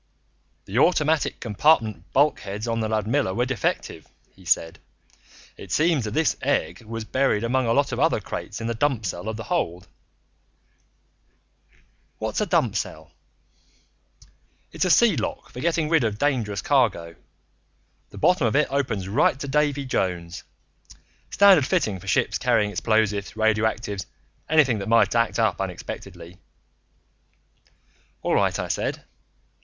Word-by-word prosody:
"The 105 +6 -1
automatic 155 -1 +2
compartment 110 - +1
bulkheads 110 -7 0
on 115 0 -1
the 110 -1 -1
Ludmilla 110 0 0
were 120 - +1
defective," 130 -4 -3 0.3
he 95 - -18
said. 80 -1 0 0.8
"It - - -11
seems 155 -6 +2
that 105 - -5
this 160 0 +2
egg 140 -2 -1
was 115 0 -6
buried 130 -4 +1
among 125 +1 0
a - - +2
lot 140 +4 +2
of 120 - -3
other 160 -4 +2
crates 105 - -6
in 115 - -5
the 115 - -1
dump 120 -2 0
cell 90 +3 -4
of 110 - -5
the 115 - -6
hold 90 - -2 1.6
" - - -38
"What's - - -3
a - - 0
dump - - +1
cell?" 80 0 -5 1.6
"It's - - -1
a - - +1
sea 225 +1 +5
lock 110 - -4
for - - -9
getting 165 +1 0
rid 160 -3 +3
of 110 -2 -1
dangerous 110 -8 -1
cargo. 100 - +1 0.9
The - - -13
bottom 180 - +3
of 110 - -1
it 150 -1 +2
opens 115 -9 -1
right 125 +5 +2
to 140 - -5
Davy 145 0 0
Jones. 90 -7 -3 0.9
Standard 190 -9 +5
fitting 110 - 0
for 95 - -14
ships 90 - +1
carrying 105 -1 +1
explosives, 105 -2 0
radioactives, 110 -2 0 0.4
anything 140 -8 +3
that 100 - -5
might 115 -3 +4
act 115 -1 +1
up - - +1
unexpectedly." 85 +1 -7 1.8
"All - - 0
right," - - +2
I - - -3
said. - - -3
115 Hz, 145 wpm, -24 LUFS, 105-145 Hz, 1.8 s, sea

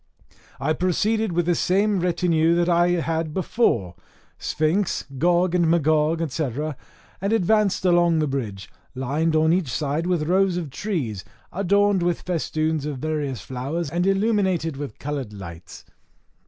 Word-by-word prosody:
I 140 +4 +1
proceeded 210 +5 0
with 175 0 0
the 175 - +2
same 195 +4 +1
retinue 170 -2 +2
that 175 0 +2
I 175 0 +4
had 165 -2 -1
before 145 - +1 0.5
Sphinx, 165 +5 0
Gog 175 +2 +2
and 175 -2 +3
Magog, 160 0 +2
&c., 150 0 -1 0.7
and 200 +2 0
advanced 210 -2 +2
along 175 -2 +4
the 155 - +2
bridge, 110 -9 -4 0.3
lined 145 +5 0
on 160 +1 +4
each 175 -8 0
side 150 +5 -1
with 175 -4 +1
rows 185 0 +2
of 160 -6 -4
trees, 135 - -3 0.3
adorned 200 +1 +2
with 175 -1 0
festoons 155 -3 -1
of 145 -3 -4
various 145 -5 -3
flowers, 140 - -4
and 175 +3 0
illuminated 195 -6 +1
with 140 -5 -7
coloured 140 -6 -4
lights. 85 -4 -10
165 Hz, 140 wpm, -23 LUFS, 150-180 Hz, 0.7 s, I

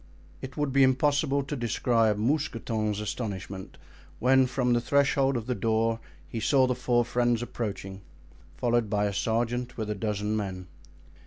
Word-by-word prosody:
It 130 +3 -8
would 145 -3 -1
be 140 - +4
impossible 140 +2 +3
to 140 +2 -4
describe 115 -3 +1
Mousqueton's 115 -4 -1
astonishment 100 -3 -5 0.4
when 130 +1 +4
from 125 -1 +1
the 120 - +2
threshold 140 0 +2
of 115 - -4
the 125 - -1
door 115 +1 +1 0.3
he 115 - -5
saw 130 +4 +4
the 125 - +1
four 120 -1 +1
friends 120 -1 +1
approaching, 100 -5 -5 0.6
followed 120 -3 +1
by 105 -1 +1
a 100 - -1
sergeant 120 +4 -1
with 110 -2 -3
a - - +1
dozen 105 0 -2
men. 95 -3 -4
120 Hz, 155 wpm, -28 LUFS, 105-130 Hz, 0.6 s, be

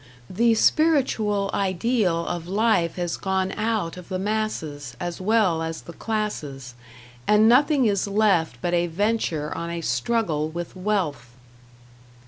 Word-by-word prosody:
The 230 +4 +3
spiritual 220 -9 +2
ideal 190 -2 0
of 170 -1 -4
life 195 -4 +1
has 175 -2 -2
gone 190 0 -1
out 215 -7 -2
of 180 -1 -11
the 185 - -2
masses 185 - -3
as 175 0 -4
well 195 -5 +2
as 165 0 -4
the 170 - -10
classes, 150 - -4 0.5
and 210 +1 +5
nothing 270 +3 +4
is 200 -2 +1
left 195 - +2
but 175 - 0
a 175 0 +2
venture 170 -5 -1
on 170 0 -4
a 170 0 -4
struggle 165 -6 0
with 170 +2 -6
wealth. 180 - -2
190 Hz, 135 wpm, -24 LUFS, 165-215 Hz, 0.5 s, and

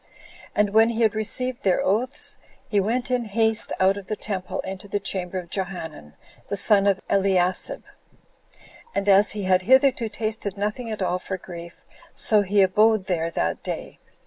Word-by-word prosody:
And 210 -1 +2
when 220 +2 +5
he 235 0 -2
had 220 - +3
received 245 +3 -1
their 185 -2 +2
oaths, 240 +8 -1 0.3
he 205 - +1
went 240 +6 -1
in 245 -2 0
haste 220 +1 +1
out 190 +1 +3
of 195 -2 -9
the 215 - -2
temple 195 -4 -4
into 190 +1 -7
the 205 +1 -2
chamber 190 -2 -4
of 175 -2 -7
Johanan, 170 - -5 0.3
the 200 - -2
son 200 0 +4
of 195 -1 +2
Eliasib, 190 -2 +1 1.1
and 200 - -1
as 200 +1 +5
he 210 -1 -4
had 185 0 +3
hitherto 260 +1 +3
tasted 215 -2 -4
nothing 210 +4 -3
at 215 -3 -3
all 180 0 0
for 190 +1 -5
grief, 170 -1 -10 0.3
so 215 -2 +3
he 200 0 +3
abode 210 +2 +3
there 170 -3 -1
that 85 - -2
day. - - -6
200 Hz, 175 wpm, -24 LUFS, 185-220 Hz, 1.1 s, when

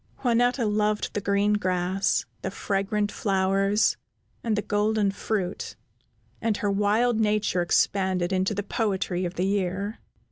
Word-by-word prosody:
Juanetta 245 0 +2
loved 210 0 0
the 205 - -2
green 200 +1 +2
grass, 185 -1 0 0.2
the - - -2
fragrant 205 +1 -1
flowers, 195 +1 +1 0.5
and 225 -2 +1
the 210 - -1
golden 210 -1 +1
fruit, 195 -2 -3 0.7
and 220 -2 0
her 205 - 0
wild 215 +4 +2
nature 210 -4 +1
expanded 185 0 +1
into 190 +3 +1
the 205 - -2
poetry 195 -4 -1
of 175 +1 -4
the 180 - 0
year. 200 +2 -1
205 Hz, 135 wpm, -26 LUFS, 190-215 Hz, 0.7 s, Juanetta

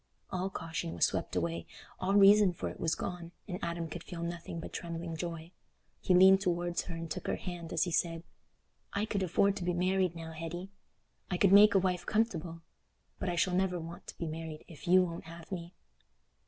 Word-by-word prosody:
All 185 0 -1
caution 165 - -4
was 85 - +4
swept - - -2
away—all 85 - -3
reason 200 -1 +7
for - - -4
it - - -10
was 165 0 +1
gone, 175 -1 -5
and 180 -2 -4
Adam 170 -1 -2
could 170 +2 -7
feel 170 -1 -6
nothing 170 0 -5
but - - -8
trembling 170 -1 -4
joy. 165 0 -5 0.5
He 185 - +3
leaned 190 +1 +8
towards 175 -2 0
her 175 - -5
and 165 0 -5
took - - -5
her - - +1
hand, 175 -3 -6
as 160 - +2
he 175 - -2
said: 165 0 0 0.7
"I 200 +1 0
could 205 -3 -2
afford 195 +2 +2
to - - -4
be 175 0 0
married 185 0 +1
now, 165 -1 -7
Hetty—I 175 +2 -8
could 195 +1 +4
make 205 +1 +8
a - - +8
wife 180 -2 0
comfortable; 170 -7 -1 0.6
but 185 - -1
I 175 - -1
shall 180 +2 +2
never 180 -1 +1
want 165 +1 -9
to - - -9
be 170 - -3
married 160 -1 -6
if 165 +2 -12
you 185 +1 +6
won't 170 -2 -5
have 165 +1 -11
me." 175 -2 -6
175 Hz, 200 wpm, -32 LUFS, 165-185 Hz, 0.7 s, leaned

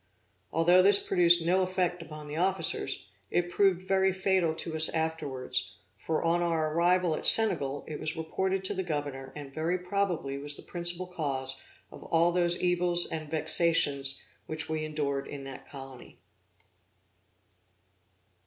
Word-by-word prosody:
Although 175 +3 +4
this 200 +1 +6
produced 175 -2 +3
no 185 +3 +2
effect 180 -1 -2
upon 155 -2 -10
the 150 0 -7
officers, 190 +3 -1 0.2
it 175 0 -1
proved 190 -2 +1
very 190 0 +2
fatal 190 -3 0
to 160 0 -5
us 160 0 +3
afterwards; 160 -5 -4 0.2
for, 160 - -3
on 170 +1 +1
our 160 -3 -1
arrival 175 0 +2
at - - +2
Senegal, 145 -11 +5
it 150 - -7
was 155 +2 -5
reported 190 +4 -2
to 190 - +1
the 190 - -3
Governor, 145 -6 -5
and 145 -2 -10
very 165 +4 -1
probably 180 -7 -3
was 145 +1 -6
the - - -13
principal 175 +1 0
cause 135 -7 -3 0.3
of - - -12
all 170 +1 +2
those 175 0 +1
evils 175 -1 +3
and 155 -2 -6
vexations 155 -3 +2 0.3
which 155 0 -4
we 155 -1 -3
endured 145 -3 -3
in 140 -1 -8
that 135 -1 -10
colony. 135 -2 -12
165 Hz, 150 wpm, -28 LUFS, 150-180 Hz, 0.3 s, this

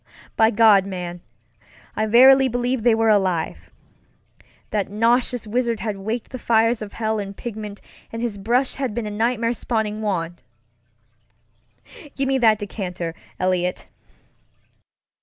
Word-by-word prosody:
By 220 0 +5
God, 210 -3 +5
man, 175 -2 -6 0.7
I 215 - 0
verily 265 +4 +7
believe 245 0 -1
they 230 0 +4
were 225 0 +2
alive! 185 -5 0 1.0
That 205 -2 -1
nauseous 235 +3 +1
wizard 235 +1 -1
had 210 -2 -3
waked 220 +4 -4
the 255 - -6
fires 230 0 +2
of 210 -1 -7
hell 220 -1 -1
in 200 -1 -6
pigment, 210 -3 -7 0.3
and 230 - -5
his 230 -4 -3
brush 245 +6 +1
had 260 -6 -3
been 235 -2 -2
a 210 - -4
nightmare 230 +2 0
spawning 220 -3 -2
wand. 175 -5 -3 1.7
Give 270 0 -1
me 270 0 +1
that 220 -3 +4
decanter, 180 -5 -5 0.3
Eliot! 180 -1 -1
220 Hz, 135 wpm, -22 LUFS, 200-235 Hz, 1.7 s, verily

